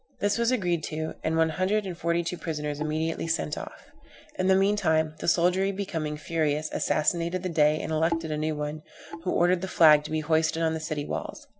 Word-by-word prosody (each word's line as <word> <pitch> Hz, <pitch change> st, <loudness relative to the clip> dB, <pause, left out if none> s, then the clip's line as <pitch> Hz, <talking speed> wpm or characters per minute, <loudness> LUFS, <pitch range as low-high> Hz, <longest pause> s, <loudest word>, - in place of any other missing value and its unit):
This 205 Hz, +2 st, +1 dB
was 235 Hz, 0 st, +2 dB
agreed 180 Hz, -10 st, 0 dB
to, 155 Hz, 0 st, -4 dB
and 160 Hz, +1 st, 0 dB
one 160 Hz, 0 st, +3 dB
hundred 190 Hz, +6 st, 0 dB
and 185 Hz, -2 st, -5 dB
forty 170 Hz, +1 st, 0 dB
two 170 Hz, -, -3 dB
prisoners 150 Hz, -4 st, -4 dB
immediately 155 Hz, +2 st, -2 dB
sent 165 Hz, -2 st, -1 dB
off. -, -, -9 dB, 0.5 s
In 185 Hz, -, +1 dB
the 190 Hz, -, +5 dB
mean 195 Hz, +2 st, +3 dB
time 160 Hz, -5 st, +1 dB
the -, -, -5 dB
soldiery 180 Hz, +3 st, +3 dB
becoming 165 Hz, -6 st, -3 dB
furious, 155 Hz, -1 st, -1 dB
assassinated 170 Hz, +3 st, 0 dB
the 185 Hz, -, -2 dB
Dey 155 Hz, -2 st, +3 dB
and -, -, -4 dB
elected 165 Hz, 0 st, 0 dB
a 150 Hz, -, -1 dB
new 155 Hz, 0 st, -1 dB
one, 150 Hz, +1 st, -4 dB, 0.4 s
who 180 Hz, -, 0 dB
ordered 175 Hz, +1 st, +2 dB
the 190 Hz, -, -3 dB
flag 155 Hz, -4 st, +6 dB
to -, -, -6 dB
be 155 Hz, 0 st, -1 dB
hoisted 160 Hz, +1 st, +1 dB
on 160 Hz, 0 st, +1 dB
the 160 Hz, -, -3 dB
city 155 Hz, -2 st, -4 dB
walls. -, -, -5 dB
160 Hz, 210 wpm, -27 LUFS, 155-180 Hz, 0.5 s, flag